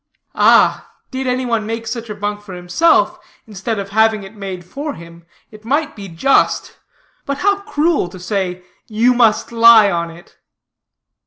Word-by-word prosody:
Ah, -, -, +3 dB, 0.2 s
did 260 Hz, 0 st, -4 dB
any 255 Hz, +1 st, -1 dB
one 230 Hz, -3 st, -1 dB
make 225 Hz, 0 st, -4 dB
such 230 Hz, 0 st, -5 dB
a 210 Hz, -, -5 dB
bunk 205 Hz, 0 st, -4 dB
for 195 Hz, -3 st, -10 dB
himself, 335 Hz, -, +2 dB, 0.3 s
instead 215 Hz, +1 st, -4 dB
of 200 Hz, 0 st, -5 dB
having 220 Hz, 0 st, +2 dB
it 195 Hz, +2 st, -11 dB
made 190 Hz, -3 st, -7 dB
for 285 Hz, -, -6 dB
him, 170 Hz, 0 st, -14 dB, 0.2 s
it 215 Hz, 0 st, -15 dB
might 285 Hz, +6 st, -1 dB
be 200 Hz, -2 st, -9 dB
just, 180 Hz, +11 st, 0 dB, 0.4 s
but 280 Hz, 0 st, -3 dB
how 400 Hz, +5 st, +1 dB
cruel, 325 Hz, -, 0 dB
to 185 Hz, +1 st, -12 dB
say, 185 Hz, -1 st, -3 dB, 0.2 s
You 230 Hz, +3 st, +2 dB
must 235 Hz, -3 st, +2 dB
lie 230 Hz, -3 st, +6 dB
on 170 Hz, -1 st, -2 dB
it! 170 Hz, +2 st, -16 dB
220 Hz, 165 wpm, -17 LUFS, 195-250 Hz, 0.4 s, lie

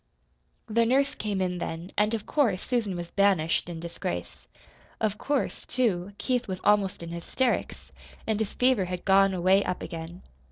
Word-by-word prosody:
The 230 Hz, 0 st, +2 dB
nurse 270 Hz, +4 st, +2 dB
came 205 Hz, -3 st, -2 dB
in 180 Hz, -1 st, -1 dB
then, 170 Hz, +2 st, -5 dB
and 210 Hz, +2 st, +2 dB
of 215 Hz, -, -6 dB
course 230 Hz, -11 st, +1 dB
Susan 225 Hz, -7 st, -1 dB
was 175 Hz, -1 st, -6 dB
banished 185 Hz, -5 st, +2 dB
in 165 Hz, -1 st, -5 dB
disgrace. 160 Hz, -, -5 dB, 0.5 s
Of 215 Hz, -1 st, -1 dB
course, 285 Hz, -2 st, -1 dB
too, 200 Hz, -6 st, 0 dB
Keith 250 Hz, -2 st, -1 dB
was 185 Hz, -1 st, -4 dB
almost 200 Hz, -3 st, +2 dB
in 170 Hz, -, -6 dB
hysterics, 170 Hz, +9 st, -2 dB, 0.3 s
and 220 Hz, -1 st, 0 dB
his 220 Hz, -2 st, -1 dB
fever 250 Hz, -6 st, +3 dB
had 180 Hz, 0 st, -5 dB
gone 195 Hz, 0 st, +5 dB
away 185 Hz, +3 st, +4 dB
up 180 Hz, -, -3 dB
again. 165 Hz, +2 st, -7 dB
195 Hz, 165 wpm, -27 LUFS, 175-225 Hz, 0.5 s, gone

